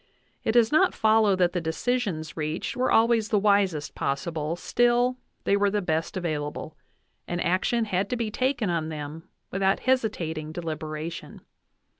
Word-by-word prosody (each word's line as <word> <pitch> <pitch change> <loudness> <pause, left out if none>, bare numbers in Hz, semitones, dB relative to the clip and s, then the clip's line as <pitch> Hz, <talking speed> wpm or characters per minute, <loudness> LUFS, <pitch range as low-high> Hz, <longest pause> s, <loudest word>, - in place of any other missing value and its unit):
It 220 - +1
does 235 -2 +4
not 315 +5 +4
follow 220 -2 +4
that 180 -1 +2
the 180 - -1
decisions 165 -2 -2
reached 155 +2 -3
were 255 +1 +1
always 225 -1 +3
the 215 - +3
wisest 195 -7 +2
possible, 150 +3 -2
still 240 +5 +2 0.2
they 200 - +3
were 200 0 +3
the 210 +1 0
best 165 -2 -1
avail 155 -5 -2
able, 155 +1 -7 0.5
and 175 - -2
action 190 +7 +1
had 195 -1 -1
to - - 0
be 230 -3 -2
taken 255 -4 0
on 160 -2 -1
them 155 +3 -7 0.2
without 195 0 +1
hesitating 170 -12 -1
deliberation. 160 -1 -5
185 Hz, 155 wpm, -26 LUFS, 160-225 Hz, 0.5 s, does